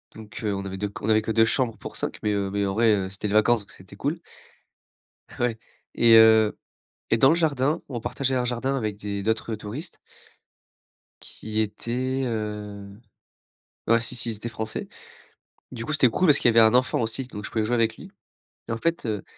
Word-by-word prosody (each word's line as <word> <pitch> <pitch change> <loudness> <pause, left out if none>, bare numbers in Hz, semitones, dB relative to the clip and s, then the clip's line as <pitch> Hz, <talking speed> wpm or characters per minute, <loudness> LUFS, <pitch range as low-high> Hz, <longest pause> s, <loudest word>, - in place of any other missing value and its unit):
Donc, 110 0 -10
heu, 105 -2 0
on 100 0 -4
avait 95 -1 -5
2 105 +1 -3
on 105 - -4
avait 110 0 +4
que 110 - -3
2 115 0 +4
chambres 115 -1 0
pour - - -9
5 - - -3
mais, 105 -1 0
heu, 100 -1 -1
mais 100 0 0
en 95 - -1
vrai 105 -3 +2
c'était 100 +2 -5
les - - -2
vacances, 110 +2 +4
donc 100 - -16
c'était 95 +2 -14
cool. 150 +10 -3 1.2
Ouais. 120 -2 0 0.4
Et 115 -1 +6
heu 110 -1 +6 0.5
et 115 - +3
dans 135 - +6
le 160 - +5
jardin, 150 -2 0
on 120 -4 -4
partageait 130 +3 -2
un 125 -1 +1
jardin 125 +3 -1
avec 110 -5 -2
des 100 -1 -4
d'autres 110 +2 -1
touristes 110 - -6 1.3
qui 110 0 -4
étaient, 125 +5 -2
heu, 105 -3 -5 1.0
ouais, 115 +1 +4
si 120 +2 -3
si, 120 0 -1
ils - - -4
étaient 115 +3 -6
français. 110 -1 -5 0.8
Du 115 -2 -5
coup, - - -6
c'était 140 -5 +4
cool 180 +9 +1
parce 145 - +6
qu'il - - +3
y 115 - +2
avait 115 - +9
un 110 - +3
enfant 125 0 +2
aussi, 115 +4 -2
donc 105 -5 -9
je - - -6
pouvais 110 -2 0
jouer 120 - 0
avec 115 -1 +1
lui. - - -11 0.6
Et - - -2
en 115 - -1
fait, 165 0 -1
heu, 105 -3 -2
110 Hz, 210 wpm, -25 LUFS, 105-125 Hz, 1.3 s, avait